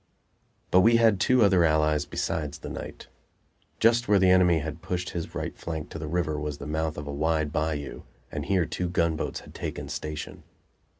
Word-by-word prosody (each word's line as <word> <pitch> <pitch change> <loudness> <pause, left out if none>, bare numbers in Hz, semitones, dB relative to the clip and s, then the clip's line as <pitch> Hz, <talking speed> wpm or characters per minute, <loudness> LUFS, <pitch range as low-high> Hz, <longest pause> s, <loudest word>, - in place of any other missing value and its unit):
But 90 - +6
we 115 +5 +5
had 115 -4 +4
two 130 0 +4
other 95 -4 +5
allies 75 -1 +2
besides 75 0 -3
the - - -8
night. - - -7 0.7
Just 120 +1 +4
where 105 - +5
the 95 -1 +5
enemy 90 -2 +5
had 80 +1 -5
pushed 90 +1 -3
his 85 -2 -5
right - - -4
flank 80 -2 -6
to 80 - -6
the 80 - -5
river 80 -2 -1
was 75 -1 -4
the 70 - -8
mouth 80 +1 -2
of 75 - -5
a 70 - -5
wide 80 0 0
bayou, 75 -2 -2 0.3
and - - -4
here 95 -4 +2
two 90 +4 -3
gunboats 85 -2 -1
had - - -14
taken - - -5
station. 75 0 -5
80 Hz, 190 wpm, -27 LUFS, 75-90 Hz, 0.7 s, But